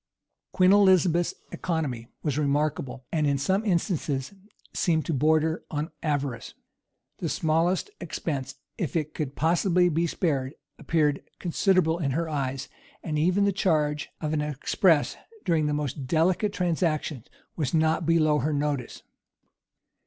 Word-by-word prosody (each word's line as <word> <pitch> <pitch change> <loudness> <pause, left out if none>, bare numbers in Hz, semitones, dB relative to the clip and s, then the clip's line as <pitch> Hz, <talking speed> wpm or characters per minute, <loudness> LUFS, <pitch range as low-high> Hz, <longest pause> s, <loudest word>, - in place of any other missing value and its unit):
Queen 185 0 +4
Elizabeth's 185 -4 +4 0.2
economy 145 -10 -3 0.2
was 150 -4 0
remarkable; 140 -3 -1
and 155 -3 +1
in 140 -1 +2
some 190 +9 +1
instances 165 -7 -1 0.4
seemed 160 -4 +1
to 165 - -1
border 155 +3 +2
on 150 +2 -3
avarice. 140 -6 -2 0.6
The - - -2
smallest 170 - +1
expense, 140 -4 -4 0.2
if 170 - -2
it 155 -2 -1
could 145 -3 -4
possibly 175 +2 +3
be 170 +1 +1
spared, 140 -5 -1 0.2
appeared 150 -3 +1 0.2
considerable 175 -2 +2
in 145 -5 0
her 165 0 -1
eyes; 135 -3 -3 0.4
and 150 -2 -2
even 180 +5 +3
the 200 - +3
charge 155 -5 0
of 155 -1 -2
an 150 - +1
express, 150 +2 +1 0.3
during 160 -3 +2
the - - 0
most 145 -2 -3
delicate 175 +7 +2
transactions, 160 - -1 0.3
was 145 -6 -1
not 160 +1 +2
below 155 -3 +3
her 150 +4 0
notice. 145 -3 -2
155 Hz, 135 wpm, -26 LUFS, 145-170 Hz, 0.6 s, Queen